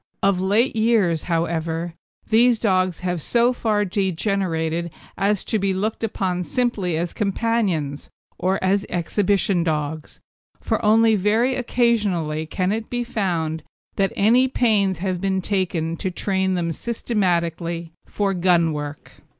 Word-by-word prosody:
Of 195 -2 +3
late 215 +7 +2
years, 215 -8 +2
however, 165 0 -1 0.3
these 235 +2 +4
dogs 185 -5 +1
have 180 -2 -2
so 240 - +2
far 215 -4 0
degenerated 175 -3 -1 0.2
as 200 0 +1
to 220 - -1
be 195 -1 0
looked 215 +4 -2
upon 185 -4 -1
simply 200 -7 -1
as 170 +1 -2
companions, 195 -9 -1 0.3
or 190 +1 +1
as 195 +1 +2
exhibition 185 +1 +1
dogs, 155 -1 -3 0.4
for - - -2
only 220 +1 +5
very 220 +6 +2
occasionally 205 -11 0
can 185 +3 -1
it 220 +1 -3
be 245 0 -2
found 170 -9 -2 0.3
that 195 -1 +1
any 240 +6 +4
pains 210 -7 +2
have 185 0 -2
been 190 -1 0
taken 175 -4 -1
to 190 - -2
train 190 0 0
them 170 -2 -1
systematically 170 -6 -2 0.2
for 200 -2 -1
gun 175 -3 +2
work. 145 0 -7
190 Hz, 135 wpm, -22 LUFS, 170-215 Hz, 0.4 s, only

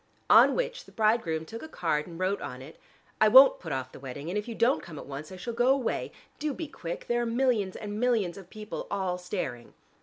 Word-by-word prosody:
On - - +7
which - - -2
the - - -16
bridegroom 215 -8 +1
took 225 +7 -8
a - - -7
card 160 - -1
and 170 -2 -9
wrote 190 +2 0
on 130 -3 -6
it: 150 +4 -13 0.4
"I 215 - +7
won't 260 +4 +8
put 165 - -7
off 130 -1 -3
the - - -12
wedding, 140 +4 -7
and 180 - -3
if 210 +1 -2
you 230 - -5
don't 245 +5 +2
come 165 -4 -10
at - - -8
once, 145 +4 -7
I - - -7
shall 235 +6 -5
go 240 +2 +2
away. 265 -3 0 0.3
Do 300 -3 -2
be 325 - -5
quick: 170 - -6
there 240 0 +1
are - - 0
millions 230 -5 +1
and 210 0 -5
millions 225 -8 +1
of 190 -3 -12
people 215 0 -7
all 190 -3 -2
staring." 140 - -5
200 Hz, 240 wpm, -28 LUFS, 165-240 Hz, 0.4 s, won't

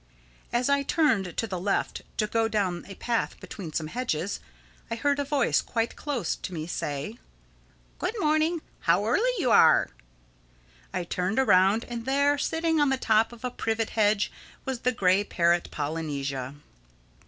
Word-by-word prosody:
As 240 +1 +1
I 280 0 +3
turned 225 - +1
to - - +1
the 190 -5 -4
left 195 +3 -1 0.2
to 215 - +2
go 225 +1 +1
down 195 -5 -1
a 195 - -9
path 235 +2 -2
between 180 -6 -8
some 155 +1 -2
hedges, 200 -2 -2 0.5
I 230 - -2
heard 285 +4 +1
a - - +1
voice 280 -3 +2
quite 230 -1 -2
close 285 -6 -2
to - - -6
me 155 -1 -4
say, 150 - -4 0.8
"Good 445 - -2
morning. 310 0 +1 0.2
How 180 +4 +2
early 410 - +2
you 255 - +1
are!" 160 - +6 1.0
I 180 - -2
turned 180 +4 -2
around, 200 -3 +4
and 235 -1 -6
there, 280 +2 +2
sitting 325 0 +1
on 290 - +4
the 265 - +1
top 225 -2 +2
of 240 +1 -9
a 250 - -2
privet 225 -2 -2
hedge, 210 -1 +2 0.3
was 265 -3 -3
the 250 - +1
gray 195 -3 +3
parrot, 170 -3 +1
Polynesia. 140 -3 -3
225 Hz, 165 wpm, -27 LUFS, 180-265 Hz, 1.0 s, are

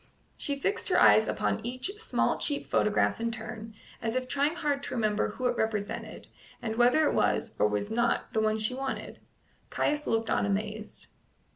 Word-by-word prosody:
She 280 -1 -2
fixed 400 +9 -1
her - - +4
eyes - - +6
upon - - -1
each 255 +9 -2
small 450 - 0
cheap 290 -1 -2
photograph 210 +1 +2
in 230 - 0
turn, 225 -1 -7 0.3
as 225 +1 -2
if 255 0 -1
trying 285 +5 +1
hard 295 -5 -1
to - - -5
remember 215 -3 +1
who 255 - -5
it 245 -1 +2
represented, 215 -3 -3 0.3
and 225 -2 -3
whether 245 +6 +4
it - - +1
was, 230 - +1
or 105 - +5
was 105 - -2
not, 235 +1 0
the 220 - +2
one 215 0 +2
she 220 +3 -1
wanted. 270 +1 -5 0.5
Caius 295 0 0
looked 225 0 0
on - - +2
amazed. 210 +2 -3
230 Hz, 180 wpm, -29 LUFS, 215-270 Hz, 0.5 s, eyes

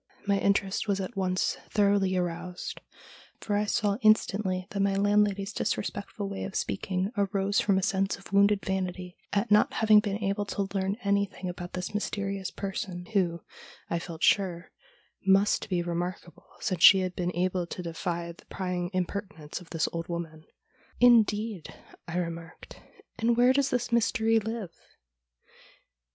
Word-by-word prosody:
My 200 -1 +2
interest 200 +1 +1
was 200 -1 +1
at 195 +4 -5
once 185 -1 0
thoroughly 200 -2 +2
aroused, 180 0 -4 0.6
for 205 - -2
I 210 +1 +1
saw 205 -1 +1
in 215 -1 +8
stantly 190 -4 -3
that 200 - -3
my 195 0 +2
landlady's 205 0 +2
disrespectful 200 0 -3
way 195 0 -5
of 195 - -6
speaking 190 +2 -1
arose 200 -1 +1
from 195 -2 +2
a 190 - 0
sense 195 0 0
of 195 0 -14
wounded 200 0 +4
vanity 185 -1 -3 0.2
at 205 +2 0
not 210 - +5
having 215 -1 +6
been 205 -1 -1
able 205 0 -1
to 200 -1 -2
learn 195 +1 -1
anything 200 -2 0
about 175 0 -7
this 185 +2 -4
mysterious 200 -2 -2
person, 190 -2 -5
who, 175 -4 +1 0.5
I 170 - +1
felt 170 -1 -7
sure, 180 -4 +2 0.5
must 195 +2 +3
be 180 -2 0
remarkable 175 0 -5
since 180 -3 -2
she 190 +1 +9
had 185 -1 -3
been 180 0 -2
able 180 0 0
to 180 - -6
defy 170 0 -3
the 170 - -16
prying 180 -2 -3
impertinence 185 -3 -4
of 175 - -15
this 160 -2 0
old 165 0 -4
woman. 165 -2 -6 0.3
' - - -31
Indeed! 215 -4 +2 0.2
' - - -14
I 170 +1 -3
remarked; 165 -1 -6 0.2
' - - -27
and 230 +1 +2
where 250 +1 +5
does 275 0 +2
this 245 -1 -1
Mystery 225 -1 +3
live 220 -4 -5
195 Hz, 165 wpm, -28 LUFS, 180-205 Hz, 0.6 s, she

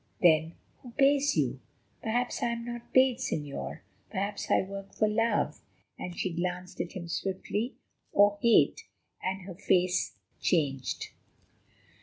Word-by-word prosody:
"Then 160 -1 +4 0.3
who 250 - -10
pays 280 +1 +4
you?" - - +1 0.4
"Perhaps 245 +2 -1
I - - +2
am 235 0 -5
not 240 0 -7
paid, 260 -1 +5
Señor; 150 - -3 0.3
perhaps 200 +1 -3
I - - +4
work 195 0 -8
for 215 - +3
love," 225 0 +1 0.3
and 180 -1 -6
she 185 - -1
glanced 180 +1 -3
at 175 - -5
him 175 -2 -6
swiftly, 195 +6 -2 0.4
"or 205 0 +5
hate," 235 -1 +4 0.3
and 190 0 -2
her 185 0 -7
face 180 0 +1 0.2
changed. 140 -7 0
195 Hz, 135 wpm, -30 LUFS, 180-235 Hz, 0.4 s, paid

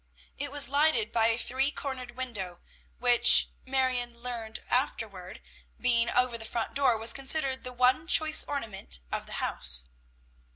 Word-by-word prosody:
It - - -3
was 285 -2 +4
lighted 310 - +1
by 225 -1 +2
a 230 0 +1
three 265 +3 -1
cornered 255 -4 -7
window, 205 -9 -6 0.4
which 245 -1 +5 0.2
Marion 255 -2 -1
learned 235 -2 -6
afterward, 205 -7 -3 0.4
being 235 -1 +1
over 250 -1 0
the - - -7
front 230 0 -4
door, 270 -4 +2
was 225 +1 0
considered 270 -1 +1
the 250 - -6
one 255 +5 +1
choice 315 -2 +4
ornament 210 - -2
of - - -4
the - - -8
house. 60 0 +2
250 Hz, 150 wpm, -28 LUFS, 225-270 Hz, 0.4 s, which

